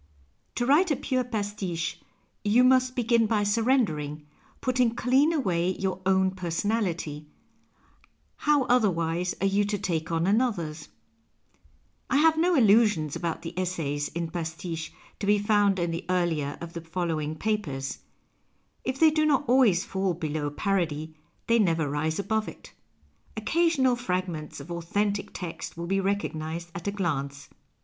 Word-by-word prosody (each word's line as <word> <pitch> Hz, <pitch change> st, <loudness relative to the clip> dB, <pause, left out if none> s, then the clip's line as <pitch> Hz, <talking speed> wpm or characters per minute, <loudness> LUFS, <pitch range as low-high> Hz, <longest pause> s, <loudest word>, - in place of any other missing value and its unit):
To 240 Hz, -, 0 dB
write 305 Hz, +8 st, +4 dB
a 295 Hz, -, +2 dB
pure 260 Hz, -1 st, -1 dB
pastiche 205 Hz, -7 st, -3 dB, 0.4 s
you 225 Hz, +4 st, +4 dB
must 255 Hz, 0 st, +4 dB
begin 235 Hz, -2 st, +2 dB
by 210 Hz, -2 st, +1 dB
surrendering, 205 Hz, -, +1 dB, 0.3 s
putting 250 Hz, -2 st, +1 dB
clean 265 Hz, +6 st, +3 dB
away 185 Hz, -, 0 dB
your 190 Hz, -1 st, -2 dB
own 190 Hz, 0 st, +3 dB
personality 175 Hz, -4 st, -2 dB, 0.6 s
— -, -, -35 dB
how 295 Hz, -2 st, +5 dB
otherwise 180 Hz, -8 st, +1 dB
are -, -, +2 dB
you 200 Hz, +1 st, +2 dB
to 205 Hz, 0 st, -1 dB
take 165 Hz, -4 st, -2 dB
on 165 Hz, 0 st, +1 dB
another's? 185 Hz, -8 st, 0 dB, 1.2 s
I 265 Hz, -, +3 dB
have 320 Hz, +2 st, +5 dB
no 345 Hz, +2 st, +2 dB
illusions 210 Hz, -, +4 dB
about 170 Hz, -2 st, -3 dB
the 165 Hz, -, -6 dB
essays 155 Hz, -6 st, -2 dB
in 170 Hz, -1 st, -4 dB
pastiche 165 Hz, -1 st, -5 dB, 0.3 s
to 200 Hz, -, -3 dB
be 205 Hz, 0 st, +5 dB
found 205 Hz, -1 st, +2 dB
in 175 Hz, -1 st, -1 dB
the 170 Hz, +2 st, -4 dB
earlier 165 Hz, -6 st, 0 dB
of 170 Hz, 0 st, -7 dB
the 170 Hz, -, -5 dB
following 165 Hz, -2 st, -2 dB
papers. 155 Hz, -9 st, -2 dB, 0.8 s
If 260 Hz, +1 st, -3 dB
they 320 Hz, -1 st, +6 dB
do 310 Hz, 0 st, +2 dB
not 290 Hz, -2 st, +2 dB
always 235 Hz, -8 st, +4 dB
fall 190 Hz, -2 st, -1 dB
below 155 Hz, -2 st, -2 dB
jiarody, 160 Hz, -2 st, -1 dB, 0.3 s
they 230 Hz, 0 st, +3 dB
never 165 Hz, -7 st, +2 dB
rise 150 Hz, +3 st, -1 dB
above 215 Hz, +2 st, -1 dB
it. -, -, -11 dB, 0.6 s
Occasional 270 Hz, +1 st, +2 dB
fragments 180 Hz, -9 st, -3 dB
of 145 Hz, +5 st, -9 dB
authentic 200 Hz, +4 st, -1 dB
text 170 Hz, -2 st, -7 dB
will 170 Hz, -, -4 dB
be 195 Hz, +3 st, 0 dB
recognized 170 Hz, -4 st, -3 dB
at 170 Hz, +2 st, -6 dB
a -, -, +1 dB
glance. 145 Hz, -8 st, -3 dB
190 Hz, 145 wpm, -27 LUFS, 165-230 Hz, 1.2 s, they